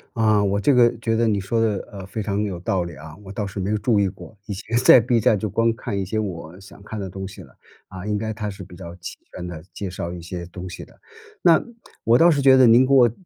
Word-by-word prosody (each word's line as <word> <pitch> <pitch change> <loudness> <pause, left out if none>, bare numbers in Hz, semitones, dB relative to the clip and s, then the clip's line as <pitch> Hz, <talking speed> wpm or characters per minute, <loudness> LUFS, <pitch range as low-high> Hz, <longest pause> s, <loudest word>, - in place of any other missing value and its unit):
啊， 110 -2 +3
我 100 0 +1
这 140 - +3
个 120 -1 +4
觉 115 -1 -1
得 115 0 +2
你 100 -3 +1
说 115 +4 -1
的， 110 -3 0
呃， 100 -2 -8
非 105 +2 -5
常 100 0 -1
有 100 -4 -3
道 90 -1 0
理 85 - -8
啊， 75 +2 -11
我 - - -10
倒 105 0 -3
是 100 0 -6
没 95 +2 -2
有 105 - +1
注 105 0 +1
意 100 - +2
过。 100 - -10
以 105 - -5
前 110 +4 -3
在 125 +1 +8
B 120 0 +1
站 105 0 +3
就 110 0 -3
光 115 +3 +1
看 100 -3 -4
一 95 - -2
些 110 +4 -3
我 90 -4 -5
想 95 +1 -15
看 110 0 -7
的 95 -2 -5
东 95 +1 -6
西 100 - -11
了， - - -18 0.4
啊， 95 +1 -8
应 105 -1 -1
该 110 +1 -3
它 105 -1 -4
是 95 - -8
比 90 -2 -13
较 85 -2 -9
齐 90 - -9
全 90 - -8
地 85 -3 -7
介 100 -2 -5
绍 85 -1 -5
一 85 - -8
些 85 +1 -6
东 90 +1 -8
西 - - -9
的。 - - -22 0.4
那， 170 -3 +5 0.4
我 115 +2 +5
倒 170 +1 +6
是 145 -2 +1
觉 135 -1 +7
得 130 -1 +6
您 120 +3 +6
给 140 - +2
我 120 -4 +6
100 Hz, 305 characters per minute, -22 LUFS, 95-115 Hz, 0.4 s, 在